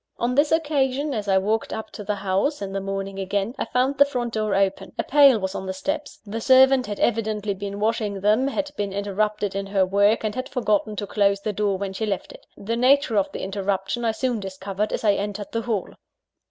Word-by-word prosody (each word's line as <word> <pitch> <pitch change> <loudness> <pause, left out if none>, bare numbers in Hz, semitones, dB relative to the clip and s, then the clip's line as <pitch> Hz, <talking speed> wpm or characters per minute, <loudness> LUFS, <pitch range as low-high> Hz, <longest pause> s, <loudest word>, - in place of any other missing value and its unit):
On 240 +1 0
this 290 +3 +3
occasion, 290 -3 +1
as 210 -3 -3
I 190 -1 +4
walked 215 +4 0
up 220 0 -5
to 210 - -8
the 205 +1 -1
house 200 +9 0
(in 195 -1 -5
the 195 - -2
morning 195 0 -4
again), 195 +3 -1
I - - 0
found 265 +2 0
the - - +10
front 245 -4 -3
door 215 -2 0
open. 195 0 0
A - - 0
pail 280 -4 +6
was 190 -2 -3
on 190 - -5
the 190 - -3
steps 295 +8 -4
the 220 +2 -5
servant 260 0 +5
had 205 -1 -5
evidently 215 -3 0
been 200 +1 -6
washing 215 -2 -1
them, 215 +6 +3
had 290 +1 -2
been 200 -5 -3
interrupted 205 0 -1
in 195 0 -3
her 195 -1 +2
work, 200 +4 +3
and 215 -1 -1
had 255 +1 -4
forgotten 215 -4 0
to 205 - -3
close 200 -1 +1
the 210 +1 -2
door 205 -1 0
when 195 0 -4
she 220 +3 -3
left 195 -3 -3
it. - - -15
The 225 +3 -3
nature 255 -1 +3
of 200 -2 +1
the - - -6
interruption 195 +3 -2
I 230 - +2
soon 240 +1 -1
discovered 195 +1 -4
as - - -3
I 210 -2 +4
entered 205 0 -4
the 230 - -1
hall. 220 -5 -2
210 Hz, 230 wpm, -24 LUFS, 195-240 Hz, -, the